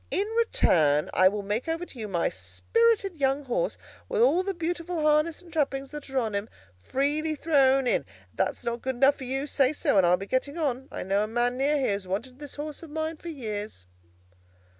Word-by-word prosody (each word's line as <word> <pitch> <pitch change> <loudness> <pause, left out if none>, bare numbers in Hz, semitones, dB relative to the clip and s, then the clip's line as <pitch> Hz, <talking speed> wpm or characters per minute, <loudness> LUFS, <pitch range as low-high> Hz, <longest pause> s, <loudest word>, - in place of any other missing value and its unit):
In 395 - 0
return, 160 - +2
I 185 - +6
will 205 +1 -1
make 210 +7 -2
over 330 +2 -2
to 265 - -13
you 215 - -4
my 175 -4 0
spirited 455 -7 0
young 270 +2 +2
horse, 270 - -1 0.3
with 485 -2 -1
all 450 -7 +4
the 390 0 -3
beautiful 340 -1 -3
harness 305 +3 +2
and 340 -3 -15
trappings 275 -3 -1
that 295 -2 -8
are 270 - -3
on 225 -4 0
him, 200 +2 -2 0.3
freely 290 - 0
thrown 275 -4 +3
in. 245 - +3
If - - -22 0.3
that's - - -1
not 235 0 -3
good 260 0 -2
enough 275 +3 +4
for 260 - -7
you, 270 +2 -2
say 275 -1 +2
so, 290 - +1
and 180 - +4
I'll 180 +1 +4
be 195 - -6
getting 270 +7 -1
on. 270 -4 -1
I - - -4
know 195 +2 +1
a - - -2
man 240 +2 0
near 280 +3 +2
here 265 -6 +1
who's 200 -2 -4
wanted 240 +8 -4
this 290 -1 -8
horse 295 0 -6
of 330 - -10
mine 315 +1 -3
for 340 - -8
years." 215 - -6
275 Hz, 220 wpm, -27 LUFS, 230-320 Hz, 0.3 s, I